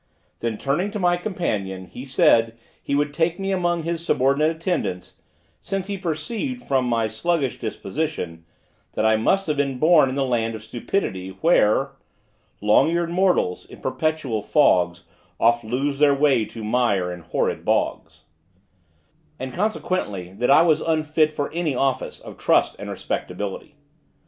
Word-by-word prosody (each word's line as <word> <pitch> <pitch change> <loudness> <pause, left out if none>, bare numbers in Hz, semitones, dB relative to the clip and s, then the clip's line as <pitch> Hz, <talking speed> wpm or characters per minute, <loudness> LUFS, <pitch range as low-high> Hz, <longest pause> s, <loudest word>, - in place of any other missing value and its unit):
Then 115 -2 -2
turning 150 - 0
to - - -2
my 175 -1 +3
companion, 105 - -3
he 125 +8 -9
said, 115 -4 +3 0.2
he 140 - -2
would 145 0 0
take 165 +3 0
me 195 0 -2
among 175 -3 0
his 170 0 -3
subordinate 140 +1 +2
attendants, 160 - -3 0.4
since 195 -1 -3
he 200 0 -3
perceived, 215 - -4
from 135 -2 +1
my 115 -2 +1
sluggish 135 +5 -1
disposition, 110 - -4 0.5
that 110 - 0
I 110 0 +5
must 195 - +2
have 150 -2 -1
been 140 -2 0
born 155 -1 +5
in 130 - -4
the 140 -1 +1
land 115 -3 0
of 110 - -9
stupidity, 110 - -3
where 135 -4 +3 0.7
Long 105 +8 +4
eared 170 0 0
mortals, 180 - +1
in - - -13
perpetual 155 -9 -1
fogs, 90 - +2 0.4
Oft 120 +1 +3
lose 135 +5 -2
their 145 -1 +5
way 140 -6 +3
to 110 +1 -9
mire 105 -6 +1
in 90 - -8
horrid 85 - -2
bogs: - - -1 1.1
and 130 -1 -6
consequently 175 - -2
that 120 +5 -1
I - - +7
was 160 -3 +3
unfit 155 -1 +1
for 145 -2 -3
any 165 -5 -1
office 135 +1 -1
of - - -12
trust - - +2
and - - -6
respectability. 100 +10 -5
140 Hz, 155 wpm, -23 LUFS, 110-170 Hz, 1.1 s, I